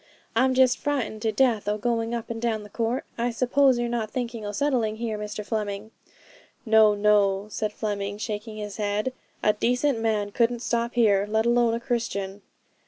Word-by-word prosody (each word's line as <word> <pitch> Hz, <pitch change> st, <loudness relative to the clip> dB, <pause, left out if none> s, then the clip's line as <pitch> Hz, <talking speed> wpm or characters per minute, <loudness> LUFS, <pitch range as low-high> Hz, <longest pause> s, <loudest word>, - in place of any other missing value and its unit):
I'm 260 Hz, +2 st, +3 dB
just 255 Hz, -1 st, +4 dB
frightened 265 Hz, -7 st, -2 dB
to 220 Hz, -1 st, +1 dB
death 230 Hz, -3 st, +2 dB
o' 210 Hz, 0 st, +1 dB
going 230 Hz, +1 st, -1 dB
up 235 Hz, 0 st, -5 dB
and 225 Hz, -1 st, -5 dB
down 225 Hz, -3 st, -1 dB
the 205 Hz, -, -13 dB
court. 235 Hz, +2 st, -1 dB
I 240 Hz, +1 st, +1 dB
suppose 255 Hz, +2 st, +3 dB
you're 240 Hz, 0 st, 0 dB
not 235 Hz, -2 st, -2 dB
thinking 235 Hz, -2 st, -4 dB
o' 205 Hz, -, -3 dB
settling 235 Hz, -3 st, 0 dB
here, 225 Hz, -1 st, -3 dB
Mr 210 Hz, 0 st, -5 dB
Fleming?' 210 Hz, -1 st, -3 dB, 0.7 s
'No, 220 Hz, -2 st, +5 dB
no,' 205 Hz, -1 st, +3 dB
said 215 Hz, 0 st, -2 dB
Fleming, 205 Hz, -1 st, -3 dB
shaking 215 Hz, +1 st, -5 dB
his 210 Hz, -1 st, -6 dB
head: 210 Hz, +4 st, -1 dB, 0.3 s
'a 210 Hz, -, +4 dB
decent 250 Hz, +4 st, +1 dB
man 215 Hz, -2 st, 0 dB
couldn't 235 Hz, +2 st, +1 dB
stop 235 Hz, 0 st, -1 dB
here, 205 Hz, -4 st, +3 dB
let 220 Hz, +1 st, +1 dB
alone 235 Hz, -1 st, +3 dB
a -, -, -2 dB
Christian.' 205 Hz, -5 st, -3 dB
225 Hz, 180 wpm, -25 LUFS, 210-240 Hz, 0.7 s, No